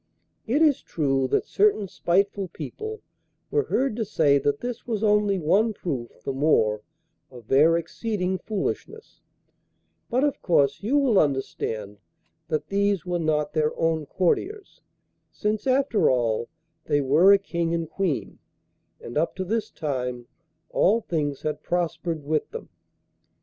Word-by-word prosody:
It 285 +8 +3
is 295 -4 +3
true 135 -4 0
that - - +1
certain 400 - +2
spiteful 195 +2 0
people 430 - -7 0.5
were 435 - +1
heard 265 -3 0
to 230 - 0
say 150 -9 +3
that 145 +1 0
this 245 0 -6
was 225 -3 -2
only 210 -2 +3
one 200 +7 +2
proof 130 -11 -5
the 135 - -3
more 110 -7 +2 0.5
of 120 -4 -14
their 155 +5 +5
exceeding 185 +2 -2
foolishness, 220 - -5 0.9
but 255 +3 +1
of 290 -1 0
course 145 -5 +2
you 240 +8 +1
will 255 -8 +4
understand 110 -7 -2 0.5
that 150 0 -2
these 200 -3 +1
were 175 -1 -1
not 150 -2 0
their 155 -1 0
own 160 -2 0
courtiers, 380 - -1 0.5
since, 210 +3 -2
after 265 -4 +3
all, 120 -3 0 0.4
they 145 -1 +2
were 150 +8 +5
a 200 - +8
King 170 -4 -2
and 165 -1 -1
Queen, 170 -2 -2 0.6
and 120 +5 -3
up 165 - -1
to 185 - -3
this 220 +3 -1
time 125 -5 -4 0.5
all 220 +5 +3
things 145 -7 -2
had 150 -1 -3
prospered 170 -2 -2
with 155 +1 -1
them. 465 +2 -8
170 Hz, 145 wpm, -25 LUFS, 145-215 Hz, 0.9 s, a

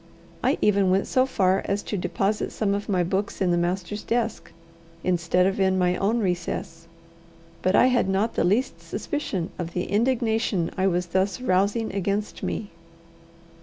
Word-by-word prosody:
I - - +2
even 200 -2 +3
went 190 +1 +2
so 260 0 +2
far 190 -6 +2
as 200 +1 -1
to - - -4
deposit 195 +3 -1
some 200 -2 0
of 200 +1 -3
my 185 -3 +2
books 190 +4 -2
in 185 -2 +2
the - - +3
master's 180 +4 -2
desk, 230 -2 -2 0.5
instead 180 0 +2
of 195 +1 0
in 190 -1 +3
my 180 -1 +2
own 205 +5 +1
recess. 175 -3 -3 0.7
But 185 - +2
I - - +6
had 250 -6 +2
not 200 +4 +1
the - - +1
least 185 -2 +1
suspicion 190 - -3
of 170 -1 -4
the 180 - -1
indignation 225 -5 0
I 190 0 +1
was 180 -1 +1
thus 190 +5 0
rousing 205 0 +1
against 200 +2 -2
me. 210 - -3
195 Hz, 165 wpm, -25 LUFS, 180-210 Hz, 0.7 s, I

